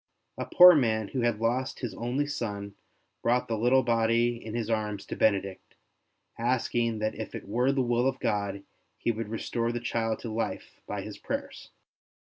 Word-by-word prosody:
A - - -3
poor 180 0 +9
man 110 - +1
who 130 - -2
had 120 -3 +1
lost 125 +3 -1
his 120 -6 -3
only 120 +8 -1
son 100 -8 -4 0.5
brought 125 +1 +1
the 115 - -1
little 125 +4 +3
body 115 0 +1
in 110 0 -6
his 115 -2 -2
arms 105 -3 -2
to - - -5
Benedict, 100 -3 0 0.6
asking 120 -1 0
that 110 0 -1
if - - -7
it - - -7
were 125 +6 +2
the 135 -1 +1
will 120 +1 +2
of 135 -1 -1
God 100 -1 -1 0.3
he 120 - 0
would 110 -1 -5
restore 115 +1 -2
the 120 - -3
child 115 -2 -1
to 115 -3 -5
life 115 - -4
by - - -4
his - - -8
prayers. - - -5
115 Hz, 180 wpm, -28 LUFS, 110-120 Hz, 0.6 s, poor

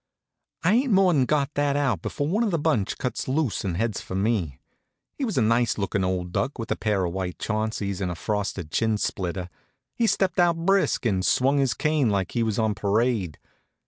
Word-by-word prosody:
I 180 +5 +4
ain't 250 +2 +2
more'n 180 -9 +4
got 145 +1 0
that 145 -1 +1
out 130 - 0
before 145 - -3
one 205 +8 +1
of 225 - +1
the 170 - 0
bunch 145 -10 0
cuts 125 - -3
loose 135 -3 0
and 90 -4 -2
heads 110 0 -1
for 95 - -7
me. 95 - 0 0.6
He 285 - -5
was 220 - -3
a 125 - +4
nice 115 +1 +2
lookin' 100 -1 -1
old 90 -1 -2
duck, 135 - -1
with 115 -2 -5
a - - +2
pair 105 -4 0
of 85 - -3
white 95 -2 -3
Chaunceys 110 -3 -2
and 90 - -1
a 85 - -4
frosted 100 -4 -3
chin 110 +5 +1
splitter. 90 -2 -3 0.5
He 230 - +1
stepped 190 -4 +1
out 170 -1 +4
brisk 195 -8 +2
and 95 -5 +1
swung 135 +7 +3
his 130 -5 +1
cane 150 -2 +1
like 100 -3 -1
he 120 - -1
was 110 -3 0
on 110 -2 +1
parade. 105 -4 0
115 Hz, 210 wpm, -25 LUFS, 95-145 Hz, 0.6 s, I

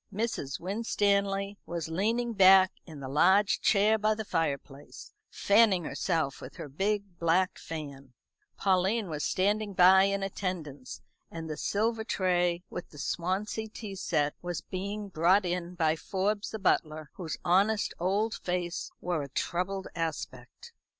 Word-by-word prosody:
Mrs. 205 - -3
Winstanley 200 0 0
was 170 -2 -4
leaning 225 +8 0
back 190 -1 +7 0.2
in 155 -4 -10
the 135 - -5
large 190 +9 +3
chair 215 +2 +3
by 215 +1 +2
the 220 0 -5
fireplace, 145 -4 -4 0.2
fanning 200 -3 +3
herself 160 -4 -2
with 130 - -10
her - - -7
big 195 +4 -2
black 170 +3 +1
fan; 140 -5 -8 0.4
Pauline 195 +1 +1
was 150 -1 -3
standing 205 +2 0
by 190 +2 +7
in 200 0 0
attendance; 170 -9 -5 0.3
and 165 -1 -7
the 155 - -4
silver 220 +6 -1
tray, 180 -4 0
with 175 - -7
the 150 - -15
Swansee 190 +8 -2
tea 215 -2 -8
set, 150 -6 0
was 175 -2 -4
being 200 +3 -5
brought 185 +3 +3
in 175 0 -3
by 160 -2 +2
Forbes 200 +5 -2
the 220 - -5
butler, 155 -6 0
whose 165 -5 -4
honest 200 +4 +2
old 200 +5 0
face 180 0 -3
wore 175 -3 -1
a 140 - -6
troubled 185 +6 -2
aspect. 150 -7 -5
185 Hz, 145 wpm, -29 LUFS, 165-200 Hz, 0.4 s, back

